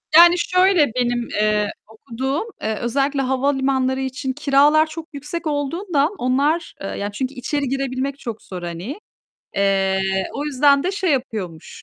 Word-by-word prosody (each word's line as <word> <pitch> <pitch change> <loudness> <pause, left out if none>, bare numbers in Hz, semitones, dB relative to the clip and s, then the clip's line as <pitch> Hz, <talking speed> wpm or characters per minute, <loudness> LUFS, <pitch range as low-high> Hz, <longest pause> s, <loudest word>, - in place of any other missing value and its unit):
Yani, 345 +1 +9
şöyle 365 -1 +4
benim, 245 -1 0
eee, 210 0 +1 0.2
okuduğum, 260 - -3 0.2
eee, 220 0 -1
özellikle 275 +3 0
havalimanları 265 0 +1
için 265 0 -3
kiralar 295 +2 +4
çok 315 0 -8
yüksek 295 +4 -5
olduğundan 300 +1 0
onlar, 280 +7 +1
eee, 195 - -4
ya 205 +1 -4
çünkü 260 +5 -3
içeri 280 +2 -2
girebilmek 270 +1 -2
çok 225 -2 -6
zor, 180 -2 -8
hani. 175 - -5 0.6
Eee, 195 -1 +2 0.3
o 285 - -3
yüzden 280 -1 +3
de 365 - 0
şey 380 -3 0
yapıyormuş, 210 -11 -4
270 Hz, 140 wpm, -21 LUFS, 235-295 Hz, 0.6 s, Yani